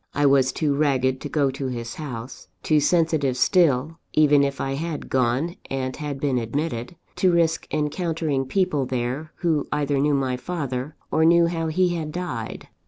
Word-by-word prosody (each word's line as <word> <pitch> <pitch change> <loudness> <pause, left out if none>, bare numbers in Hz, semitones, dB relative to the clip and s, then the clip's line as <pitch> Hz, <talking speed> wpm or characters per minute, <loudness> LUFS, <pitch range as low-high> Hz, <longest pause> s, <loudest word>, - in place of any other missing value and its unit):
I 145 - +2
was 135 -2 +4
too 150 -3 0
ragged 130 -3 +1
to - - -5
go 140 -3 +1
to 135 0 -4
his 120 -2 -5
house, 130 -5 -7 0.2
too 155 -1 +3
sensitive 155 -4 +2
still 160 -1 +2
(even 150 -2 +5
if 140 0 -2
I 135 - -2
had 155 +2 -4
gone 130 +7 +1
and 130 -1 -2
had 145 -2 -5
been 135 -3 +1
admitted) 120 +3 -3 0.2
to 185 - +4
risk 165 -1 +1
encountering 155 -2 -1
people 150 -4 0
there, 130 +5 -3
who 160 -4 +1
either 145 -1 0
knew 145 +1 +2
my 130 -2 0
father, 140 -2 -4 0.2
or 160 - +3
knew 170 +1 +6
how 165 -1 -1
he 180 +3 +2
had 160 -3 -3
died. 150 -11 -5
145 Hz, 170 wpm, -24 LUFS, 130-160 Hz, 0.2 s, knew